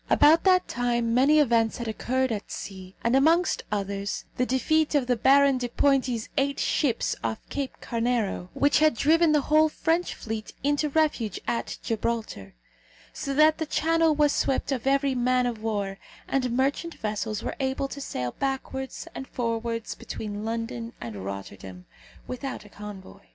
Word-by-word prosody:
About 315 Hz, +4 st, +5 dB
that 370 Hz, -1 st, +4 dB
time 240 Hz, -1 st, 0 dB
many 275 Hz, +5 st, +5 dB
events 230 Hz, -6 st, +3 dB
had 235 Hz, -, -5 dB
occurred 260 Hz, +3 st, -1 dB
at 210 Hz, -2 st, -4 dB
sea, 190 Hz, -1 st, -8 dB
and 235 Hz, +2 st, +2 dB
amongst 330 Hz, +6 st, +3 dB
others, 200 Hz, 0 st, -3 dB
the 250 Hz, -, 0 dB
defeat 305 Hz, +5 st, +1 dB
of 280 Hz, -3 st, +3 dB
the 245 Hz, 0 st, +2 dB
Baron 275 Hz, +2 st, +4 dB
de 245 Hz, -1 st, -3 dB
Pointi's 255 Hz, -3 st, +1 dB
eight 280 Hz, 0 st, 0 dB
ships 260 Hz, -7 st, +1 dB
off 115 Hz, -1 st, -1 dB
Cape 275 Hz, -2 st, -4 dB
Carnero, 230 Hz, -6 st, -1 dB
which 285 Hz, +1 st, +3 dB
had 310 Hz, -4 st, +4 dB
driven 320 Hz, +5 st, +4 dB
the 300 Hz, -1 st, +4 dB
whole 310 Hz, +2 st, +4 dB
French 330 Hz, +3 st, 0 dB
fleet 220 Hz, -1 st, -6 dB
into 290 Hz, +1 st, +1 dB
refuge 280 Hz, -, 0 dB
at 235 Hz, -, -2 dB
Gibraltar; 225 Hz, -, -3 dB, 0.6 s
so 275 Hz, -1 st, -4 dB
that 310 Hz, +2 st, +5 dB
the 320 Hz, -, -2 dB
Channel 325 Hz, 0 st, +2 dB
was 295 Hz, -1 st, +3 dB
swept 270 Hz, +1 st, 0 dB
of 265 Hz, -1 st, -2 dB
every 275 Hz, 0 st, +2 dB
man 250 Hz, 0 st, +2 dB
of 235 Hz, -3 st, -3 dB
war, 200 Hz, -3 st, -2 dB, 0.3 s
and 260 Hz, -2 st, 0 dB
merchant 280 Hz, +5 st, 0 dB
vessels 215 Hz, 0 st, -3 dB
were -, -, -3 dB
able 265 Hz, +1 st, -1 dB
to 280 Hz, -, -7 dB
sail 125 Hz, -, -3 dB
backwards 265 Hz, -1 st, -3 dB
and 265 Hz, -, -7 dB
forwards 230 Hz, -1 st, -2 dB
between 210 Hz, -1 st, -6 dB
London 230 Hz, +1 st, -4 dB
and 110 Hz, -5 st, -7 dB
Rotterdam, 95 Hz, -1 st, -8 dB, 0.4 s
without 255 Hz, -3 st, -5 dB
a -, -, -14 dB
convoy. 205 Hz, -2 st, -10 dB
250 Hz, 160 wpm, -26 LUFS, 220-280 Hz, 0.6 s, About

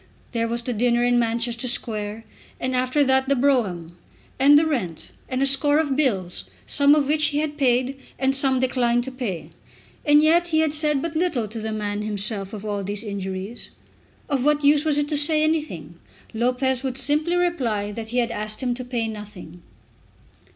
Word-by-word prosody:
There 230 Hz, -1 st, -1 dB
was 235 Hz, +1 st, -2 dB
the 245 Hz, -, -2 dB
dinner 240 Hz, +2 st, +2 dB
in 245 Hz, 0 st, +3 dB
Manchester 235 Hz, +1 st, -1 dB
Square, 215 Hz, -2 st, -2 dB, 0.4 s
and 255 Hz, 0 st, -2 dB
after 255 Hz, +3 st, +2 dB
that 265 Hz, 0 st, +2 dB
the 280 Hz, -, +4 dB
brougham, 195 Hz, -11 st, 0 dB, 0.4 s
and 285 Hz, +2 st, +7 dB
the 315 Hz, -, +4 dB
rent, 215 Hz, -, -3 dB, 0.2 s
and 255 Hz, +1 st, 0 dB
a -, -, +4 dB
score 280 Hz, +2 st, +2 dB
of 295 Hz, -4 st, +1 dB
bills, 190 Hz, -, 0 dB, 0.2 s
some 285 Hz, -, +4 dB
of 290 Hz, -2 st, +1 dB
which 300 Hz, 0 st, +3 dB
he 290 Hz, 0 st, -1 dB
had 300 Hz, 0 st, -1 dB
paid 260 Hz, -1 st, +1 dB, 0.2 s
and 265 Hz, +1 st, +1 dB
some 270 Hz, -1 st, +1 dB
declined 245 Hz, -2 st, +1 dB
to 265 Hz, -, -6 dB
pay! 235 Hz, -10 st, -5 dB, 0.5 s
And 295 Hz, 0 st, +5 dB
yet 340 Hz, +2 st, +4 dB
he 315 Hz, -2 st, +2 dB
had 310 Hz, -2 st, +1 dB
said 300 Hz, -2 st, +1 dB
but 330 Hz, -1 st, -4 dB
little 315 Hz, -10 st, 0 dB
to 220 Hz, +2 st, -7 dB
the 220 Hz, 0 st, -4 dB
man 210 Hz, -1 st, -3 dB
himself 205 Hz, -1 st, -2 dB
of 215 Hz, -1 st, -8 dB
all 205 Hz, -1 st, -2 dB
these 205 Hz, +2 st, -4 dB
injuries. 195 Hz, +1 st, -5 dB, 0.6 s
Of 275 Hz, -5 st, 0 dB
what 295 Hz, +1 st, +2 dB
use 290 Hz, +1 st, +4 dB
was 300 Hz, -2 st, +2 dB
it 290 Hz, 0 st, +1 dB
to 300 Hz, -, 0 dB
say 305 Hz, +1 st, +3 dB
anything? 180 Hz, -, -2 dB, 0.3 s
Lopez 250 Hz, +2 st, 0 dB
would 265 Hz, -2 st, -3 dB
simply 305 Hz, +5 st, +1 dB
reply 250 Hz, -13 st, 0 dB
that 220 Hz, +1 st, -6 dB
he 245 Hz, -, -3 dB
had 240 Hz, -1 st, +1 dB
asked 215 Hz, +2 st, -4 dB
him 245 Hz, -1 st, 0 dB
to 255 Hz, +1 st, -6 dB
pay 240 Hz, -2 st, -2 dB
nothing. 205 Hz, -6 st, -9 dB
250 Hz, 195 wpm, -23 LUFS, 215-290 Hz, 0.6 s, and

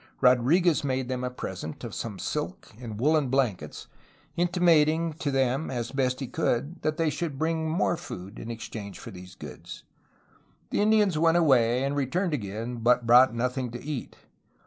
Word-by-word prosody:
Rodriguez 145 Hz, +8 st, +4 dB
made 130 Hz, -2 st, -1 dB
them 125 Hz, -1 st, -2 dB
a 125 Hz, -, -1 dB
present 95 Hz, -10 st, -7 dB
of -, -, -6 dB
some 110 Hz, -4 st, -5 dB
silk 150 Hz, -, -4 dB
and 110 Hz, -4 st, -7 dB
woolen 150 Hz, +2 st, +3 dB
blankets, 125 Hz, -7 st, -1 dB, 0.5 s
intimating 165 Hz, -2 st, +3 dB
to 150 Hz, -, -1 dB
them, 135 Hz, +2 st, 0 dB
as 120 Hz, -3 st, -3 dB
best 130 Hz, -1 st, 0 dB
he -, -, -1 dB
could, 135 Hz, +6 st, -2 dB
that 155 Hz, 0 st, -1 dB
they 160 Hz, -2 st, +1 dB
should 155 Hz, -3 st, -4 dB
bring 160 Hz, +1 st, -1 dB
more 170 Hz, +1 st, +1 dB
food 95 Hz, -, -8 dB
in 115 Hz, -, -7 dB
exchange 110 Hz, -3 st, -7 dB
for -, -, -9 dB
these 90 Hz, 0 st, -11 dB
goods. -, -, -10 dB, 0.9 s
The -, -, +1 dB
Indians 210 Hz, -6 st, +3 dB
went 165 Hz, +1 st, +4 dB
away 130 Hz, -6 st, +3 dB
and 140 Hz, +1 st, -1 dB
returned 160 Hz, +6 st, 0 dB
again, 115 Hz, 0 st, -4 dB
but 120 Hz, +1 st, +2 dB
brought 120 Hz, +1 st, +6 dB
nothing 125 Hz, +1 st, -1 dB
to 120 Hz, -, -7 dB
eat. 145 Hz, -3 st, -5 dB
135 Hz, 170 wpm, -27 LUFS, 120-160 Hz, 0.9 s, brought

